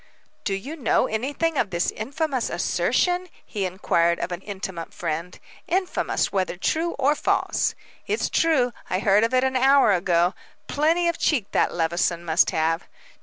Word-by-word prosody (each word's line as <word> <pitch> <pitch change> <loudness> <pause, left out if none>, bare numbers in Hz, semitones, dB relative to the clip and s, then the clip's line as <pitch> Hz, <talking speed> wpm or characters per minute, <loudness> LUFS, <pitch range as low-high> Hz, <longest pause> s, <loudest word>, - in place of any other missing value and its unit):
"Do 195 - 0
you 265 +11 -6
know 275 -8 +2
anything 285 +7 -1
of 210 - +1
this 175 -1 0
infamous 270 +2 -2
assertion?" 360 0 0 0.2
he 200 -3 -3
inquired 170 -2 +1
of 180 - -4
an 175 +1 -4
intimate 190 -4 -6
friend 170 +1 -4 0.3
"infamous, 365 +1 0
whether 185 -2 -1
true 325 - 0
or 280 +1 +3
false." 300 - 0 0.3
"It's 430 - 0
true, 270 -7 +2 0.2
I 185 - +1
heard 200 +2 +3
of 230 - +1
it 255 - +3
an 265 0 0
hour 270 -2 +5
ago. 175 -1 +2 0.3
Plenty 325 +4 +1
of 340 - -1
cheek 250 -11 +1
that - - +1
Levison 170 +1 0
must 160 +2 +3
have." 165 +2 0
215 Hz, 160 wpm, -24 LUFS, 175-290 Hz, 0.3 s, hour